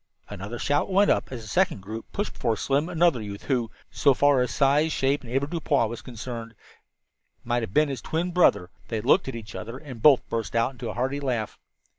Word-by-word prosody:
Another 105 +6 -6
shout 145 +8 0
went 200 +2 +4
up - - 0
as 120 -3 -6
a - - -10
second 105 -1 +1
group 110 +3 -7
pushed 205 - -3
before 115 -2 -1
Slim 140 - 0
another 170 -7 +2
youth 100 -1 -7
who, 125 -5 0 0.2
so 140 - +3
far 145 -1 +4
as 125 - 0
size, 145 +3 +2
shape 135 0 0
and 120 - -10
avoirdupois 140 -1 +1
was 115 +1 -5
concerned, 115 -1 -7 0.9
might 120 0 0
have 110 - -5
been 150 +7 +3
his 135 -4 -4
twin 170 +6 -2
brother. 165 - +3 0.2
They 115 - -2
looked 180 - +3
at 135 - -4
each 110 -2 -8
other 115 +3 -6
and 135 -6 -10
both 140 -1 +5
burst 115 -1 -3
into 120 +2 -1
a - - -6
hearty 130 +4 -1
laugh. 125 -6 -3
130 Hz, 205 wpm, -26 LUFS, 115-145 Hz, 0.9 s, both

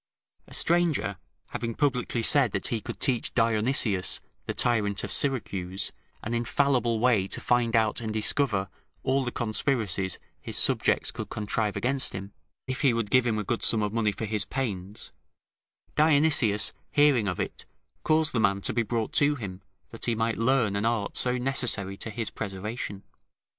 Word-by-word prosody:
A - - -5
stranger 165 - +1 0.3
having 115 -1 -4
publicly 125 -4 0
said, 135 -4 +4
that 95 - 0
he 115 -2 -2
could - - -7
teach 125 -4 0
Dionysius, 115 -3 +2 0.3
the - - -1
tyrant 105 -5 +1
of - - -3
Syracuse, 100 -8 0 0.3
an 115 - -3
infallible 120 -1 +1
way 110 -5 +3
to - - -5
find 120 -1 +1
out 110 0 +2
and 110 -1 -3
discover 110 -2 +1 0.4
all 135 +1 +1
the 125 - -3
conspiracies 110 -6 0 0.2
his - - -3
subjects - - +3
could - - -6
contrive 105 0 -2
against 130 +2 -1
him, 100 +1 -7 0.3
if 130 0 -4
he 135 -5 +3
would 115 -3 -2
give 125 -1 +4
him 110 -2 +1
a 105 - -1
good 115 +3 -2
sum 110 -2 +3
of 105 0 -2
money 110 -2 +1
for 110 - -5
his 105 0 -1
pains, 105 -5 -5 0.8
Dionysius 150 -8 +3 0.2
hearing 145 -7 +4
of 90 - -2
it, - - -5 0.3
caused 155 0 +2
the 120 - +1
man 100 -3 +2
to - - -1
be 120 - +2
brought 115 +4 -2
to 145 -2 +3
him, 95 -7 -7 0.3
that 115 - -5
he 120 - +1
might 115 0 -1
learn 115 -4 +2
an 100 - -1
art 115 -3 -1
so 125 0 +1
necessary 125 -7 -1
to 110 - -5
his 110 +1 -4
preservation. 100 0 -5
115 Hz, 170 wpm, -27 LUFS, 105-130 Hz, 0.8 s, said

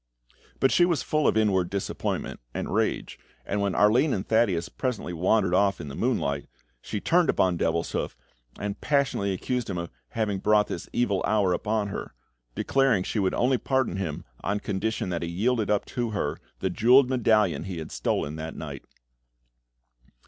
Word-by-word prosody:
But 135 - +3
she 175 - +5
was 170 -5 +2
full 155 -1 +1
of - - +3
inward 95 -5 +2
disappointment 100 -1 -3 0.2
and - - -3
rage, - - -1 0.3
and 100 +1 -1
when 100 -3 0
Arline 120 +8 +4
and 95 - -3
Thaddeus 100 -7 +2
presently 125 -9 -3
wandered 95 +2 +2
off 100 +1 +3
in 75 - -6
the 70 - -7
moonlight, 70 0 -1 0.3
she 105 - -4
turned 170 - +3
upon 90 -1 +3
Devilshoof, 85 -6 -1 0.4
and 100 0 -4
passionately 135 -9 +1
accused 120 +5 -2
him 95 - -2
of 85 0 -4 0.2
having 105 -4 -1
brought 105 +1 +4
this - - -5
evil 100 -6 +1
hour 100 -4 +2
upon 105 +2 -1
her, - - -6 0.4
declaring 135 -8 +2
she 110 - -2
would 95 -2 +1
only 125 +1 +2
pardon 130 -8 0
him 85 -6 -4 0.2
on 100 +1 0
condition 105 +1 -2
that 85 -2 -2
he 85 - -3
yielded 110 +5 0
up 105 -1 +1
to 120 -3 -2
her 100 -9 -2 0.2
the 95 - 0
jewelled 125 +6 +5
medallion 110 -9 +2
he 95 -3 -5
had 80 -1 -6
stolen 75 +2 -1
that 80 0 -6
night. - - -7
105 Hz, 170 wpm, -26 LUFS, 90-120 Hz, 0.4 s, she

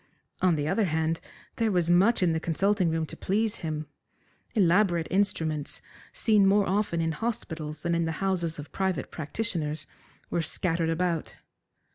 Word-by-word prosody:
On 180 -3 +4
the 145 -1 -1
other 215 +6 +2
hand, 160 -1 0 0.4
there 225 -1 +2
was 175 -3 +2
much 195 +4 +4
in 170 -2 +3
the 160 - 0
consulting 185 +3 +1
room 160 0 0
to - - -9
please 215 +3 0
him. 155 -2 -4 0.7
Elaborate 180 -3 +3
instruments, 160 -6 +1 0.3
seen 210 -3 +3
more 200 +1 +4
often 190 -3 +1
in 165 0 0
hospitals 160 -7 -4
than 170 0 0
in 170 0 +1
the 160 - -1
houses 175 -2 -1
of 145 0 -8
private 190 -7 -1
practitioners, 155 -2 -3 0.5
were 170 - +1
scattered 165 0 -1
about. 165 -1 -1
170 Hz, 155 wpm, -28 LUFS, 160-195 Hz, 0.7 s, On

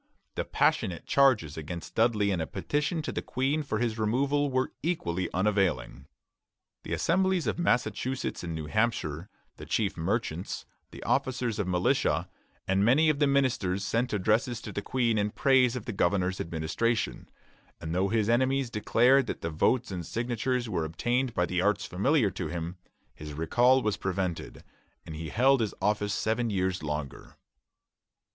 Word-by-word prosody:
The - - -3
passionate 90 -3 0
charges 125 - +3
against 80 +2 -6
Dudley 110 -3 +2
and 90 -4 -1
a 80 - -3
petition 150 +2 -2
to - - -3
the - - -3
Queen 135 +5 -1
for 140 -7 -2
his 115 -1 -1
removal 140 +6 +1
were 130 0 0
equally 95 - -2
unavailing. 95 -9 0 0.7
The - - -5
Assemblies 190 0 +1
of - - -1
Massachusetts 130 - -1
and 85 -2 -4
New 80 -1 -4
Hampshire, 90 -4 -1 0.3
the - - -10
chief 105 -3 0
merchants, 90 0 -2 0.2
the - - -10
officers 125 -4 0
of 100 - -1
militia, 90 -1 +1 0.4
and 95 +1 +2
many 140 +8 +4
of 150 -2 +1
the 145 - +4
ministers 115 -9 +1
sent 120 +5 0
addresses 110 +4 +1
to - - -7
the - - -3
Queen 120 -4 +1
in 105 0 +1
praise 130 0 +3
of 125 - -5
the 115 - -4
governor's 95 0 +1
administration; 85 +8 -2 0.5
and 80 0 -5
though 95 +2 +2
his 110 0 +1
enemies 130 +2 +2
declared 125 +5 +3
that - - -4
the 80 - -3
votes 125 +9 +1
and 90 -2 -4
signatures 120 +1 -1
were 85 -7 -1
obtained 120 +10 -1
by 90 - +2
the 90 0 -1
arts 105 +3 +1
familiar 110 - +2
to - - -4
him, 85 +2 -4 0.4
his 75 0 -9
recall 120 - +3
was 105 -2 0
prevented, 95 -3 -3 0.4
and 80 - -8
he 80 0 -5
held 130 +3 +3
his 110 -3 -2
office 105 -1 0
seven 115 +2 0
years 95 -2 -1
longer. 75 -3 -5
110 Hz, 165 wpm, -28 LUFS, 90-130 Hz, 0.7 s, many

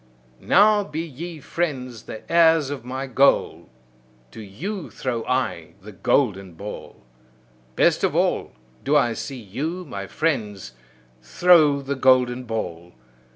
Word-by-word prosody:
Now 210 +1 +4
be 155 -3 -5
ye 165 +1 -7
friends 130 -10 -4
the 110 - -8
heirs 165 -4 +4
of 140 -5 -6
my 130 +2 -5
goal; 135 +1 +2 0.6
to - - -10
you 160 - -6
throw 120 -3 -3
I 125 -11 -2
the 105 +2 -12
golden 95 -2 0
ball. 100 +6 -9 0.7
Best - - +3
of - - +1
all, - - 0 0.3
do 145 +2 +1
I 120 -5 +3
see 135 +3 -6
you, 150 - -5
my 100 - -6
friends, 105 - -2 0.5
throw 150 - +4
the 140 +1 -2
golden 130 -1 +3
ball! 90 -7 -5
130 Hz, 130 wpm, -23 LUFS, 110-160 Hz, 0.7 s, Now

